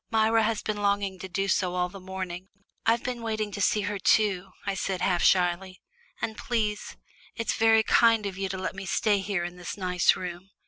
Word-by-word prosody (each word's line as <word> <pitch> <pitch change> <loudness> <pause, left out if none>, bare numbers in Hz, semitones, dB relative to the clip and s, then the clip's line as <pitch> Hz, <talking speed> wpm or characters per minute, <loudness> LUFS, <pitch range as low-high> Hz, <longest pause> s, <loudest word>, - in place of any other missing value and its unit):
"Myra 225 0 +3
has 220 -1 0
been 215 -1 -2
longing 200 -2 0
to 190 - -7
do 195 +2 -1
so 180 -2 +1
all 180 0 +1
the 195 +2 -11
morning." 185 -1 -6 0.4
"I've 230 +1 +3
been 245 -2 -3
wanting 215 -2 -2
to 205 - -5
see 210 +2 +2
her 205 0 -3
too," 195 -1 +2 0.2
I 200 - 0
said, 190 -1 -2
half 175 -3 +1
shyly. 185 +1 +2 0.4
"And 220 - -2
please 215 -3 -2 0.4
it's 230 - -1
very 225 0 +4
kind 225 -1 +4
of 195 -2 -3
you 195 0 -3
to 190 - -4
let 185 - -3
me 190 0 -7
stay 205 +2 +2
here 195 -2 -2
in 175 +1 -6
this 180 +2 -6
nice 180 -2 +2
room. 180 +1 -7
195 Hz, 210 wpm, -27 LUFS, 185-215 Hz, 0.4 s, very